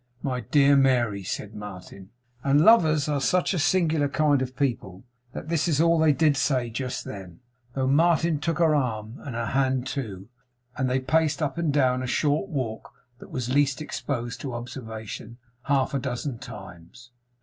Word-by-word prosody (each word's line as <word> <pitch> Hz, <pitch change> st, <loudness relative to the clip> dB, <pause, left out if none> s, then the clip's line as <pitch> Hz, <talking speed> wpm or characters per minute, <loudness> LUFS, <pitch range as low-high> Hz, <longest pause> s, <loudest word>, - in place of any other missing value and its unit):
'My 130 Hz, -3 st, -1 dB
dear 140 Hz, +5 st, +4 dB
Mary,' 125 Hz, -7 st, +2 dB
said 105 Hz, +3 st, -5 dB
Martin; 100 Hz, -2 st, -10 dB, 0.3 s
and 140 Hz, +1 st, +4 dB
lovers 160 Hz, -10 st, +5 dB
are 145 Hz, -2 st, 0 dB
such 180 Hz, +7 st, +1 dB
a 180 Hz, -, -1 dB
singular 160 Hz, -4 st, +2 dB
kind 145 Hz, -2 st, +2 dB
of 130 Hz, 0 st, -4 dB
people 110 Hz, -9 st, -2 dB, 0.3 s
that -, -, -7 dB
this 165 Hz, 0 st, 0 dB
is 155 Hz, -4 st, +1 dB
all 165 Hz, 0 st, +4 dB
they 160 Hz, -1 st, +5 dB
did 150 Hz, 0 st, +3 dB
say 130 Hz, -4 st, 0 dB
just 130 Hz, +2 st, -4 dB
then, 95 Hz, -4 st, -9 dB, 0.4 s
though 135 Hz, -1 st, 0 dB
Martin 160 Hz, +2 st, +3 dB
took 165 Hz, +2 st, -1 dB
her 165 Hz, -3 st, +3 dB
arm, 115 Hz, -4 st, -2 dB
and 130 Hz, -4 st, -7 dB
her 115 Hz, 0 st, -2 dB
hand 130 Hz, +1 st, 0 dB
too, 110 Hz, -9 st, -5 dB, 0.5 s
and 130 Hz, -1 st, 0 dB
they 130 Hz, +1 st, +1 dB
paced 155 Hz, +2 st, +1 dB
up 150 Hz, +1 st, -2 dB
and 165 Hz, -3 st, +1 dB
down 130 Hz, -3 st, +2 dB
a 130 Hz, -, -3 dB
short 150 Hz, +8 st, 0 dB
walk 130 Hz, -9 st, -4 dB, 0.3 s
that -, -, -12 dB
was 125 Hz, 0 st, -3 dB
least 140 Hz, 0 st, +2 dB
exposed 125 Hz, -5 st, -4 dB
to 130 Hz, -4 st, -5 dB
observation, 115 Hz, -2 st, -7 dB, 0.3 s
half 135 Hz, -2 st, +1 dB
a 140 Hz, -, +1 dB
dozen 125 Hz, -1 st, -4 dB
times. 95 Hz, +2 st, -11 dB
135 Hz, 175 wpm, -25 LUFS, 120-150 Hz, 0.5 s, lovers